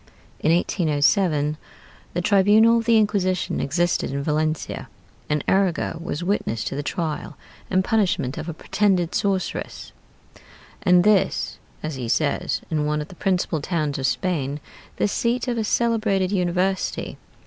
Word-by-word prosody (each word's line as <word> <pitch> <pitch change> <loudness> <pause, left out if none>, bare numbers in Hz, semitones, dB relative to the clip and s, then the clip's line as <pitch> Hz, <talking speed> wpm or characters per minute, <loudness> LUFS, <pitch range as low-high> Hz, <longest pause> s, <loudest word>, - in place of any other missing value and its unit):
In 160 - +2
1807 155 -2 +2 0.6
the 175 - +1
tribunal 215 +4 +5
of 230 - -4
the 230 -1 +5
Inquisition 195 -4 +1
existed 175 +5 0
in 140 +1 -3
Valencia; 155 +1 -2 0.4
and 150 -1 0
Arago 185 -4 +1
was 170 -1 -4
witness 175 - -1
to - - -4
the 145 - -2
trial 155 0 -4 0.3
and 185 0 +2
punishment 185 - +1
of 165 - -5
a - - -3
pretended 185 -2 +1
sorceress, 195 -2 -2 0.9
and 180 -2 +5
this, 210 -2 +2 0.2
as 155 -3 -4
he 120 -3 -4
says, 145 +3 0
in 150 -2 0
one 150 0 0
of 150 - -6
the 185 - -12
principal 180 -4 0
towns 150 -4 -1
of 135 - +1
Spain, 140 +1 -1 0.4
the - - +1
seat 235 +4 -1
of 240 -2 -1
a - - 0
celebrated 215 -4 +1
university. 185 0 -1
175 Hz, 145 wpm, -23 LUFS, 150-200 Hz, 0.9 s, tribunal